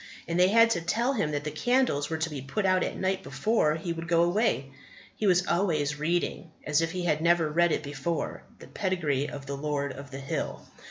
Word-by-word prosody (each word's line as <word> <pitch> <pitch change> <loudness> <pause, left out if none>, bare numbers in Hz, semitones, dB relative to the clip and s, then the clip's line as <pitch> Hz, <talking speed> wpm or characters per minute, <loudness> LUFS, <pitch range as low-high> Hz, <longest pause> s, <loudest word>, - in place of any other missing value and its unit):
And 170 +2 -1
they 180 - +6
had 230 +3 +5
to 170 - +1
tell 230 +10 0
him 205 - 0
that 145 -1 -2
the 150 - -3
candles 155 - +1
were 160 - -1
to 160 0 -1
be 140 -3 -5
put 140 +10 -2
out 185 -1 +3
at - - -3
night 190 0 0
before 150 +2 +1
he 170 +1 -3
would 165 0 -6
go 170 -1 +4
away. 175 - +1 0.4
He 215 - -1
was 180 -1 +4
always 150 -5 0
reading, 170 +2 -1 0.2
as 150 +1 +2
if 165 - 0
he 180 0 -3
had 155 -2 +1
never 170 -2 +3
read 170 +2 +3
it - - 0
before, 145 +3 -3 0.2
the - - -12
pedigree 155 -8 -1
of 140 -1 -8
the 140 0 -4
Lord 140 -1 -2
of 140 +1 -10
the 135 - -7
Hill. 135 0 -4
165 Hz, 225 wpm, -28 LUFS, 145-185 Hz, 0.4 s, they